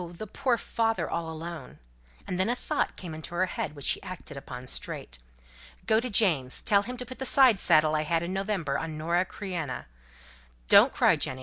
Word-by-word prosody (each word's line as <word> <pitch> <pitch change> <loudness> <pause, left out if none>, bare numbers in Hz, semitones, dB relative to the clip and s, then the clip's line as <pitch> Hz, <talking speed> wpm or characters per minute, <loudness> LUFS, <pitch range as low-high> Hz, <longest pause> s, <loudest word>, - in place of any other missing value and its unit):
the 175 +5 -8
poor 250 +3 0
father 225 0 -1
all 165 -1 -3
alone!" 160 -3 -7 0.5
And 180 - -3
then 190 - +2
a 240 - +1
thought - - -2
came 175 -4 -8
into 160 +2 -7
her 185 +2 +2
head, 155 -4 -4
which 145 - -8
she - - +2
acted 180 -5 -9
upon 125 -2 -8
straight. - - -6 0.7
"Go 220 -1 +4
to 250 +2 -3
James, 165 - +2
tell 200 -1 +4
him 250 +4 -6
to 250 - -5
put 255 +2 -10
the - - -2
side 255 -7 +6
saddle 155 -1 +4
I 155 - +1
had 165 +2 0
in 175 +2 -3
November 190 -8 -1
on 160 -1 -5
Nora 170 +4 +1
Creina. 180 -10 -5 0.8
Don't - - +7
cry, - - +3
Jenny. 130 - -3
175 Hz, 200 wpm, -28 LUFS, 155-215 Hz, 0.8 s, Don't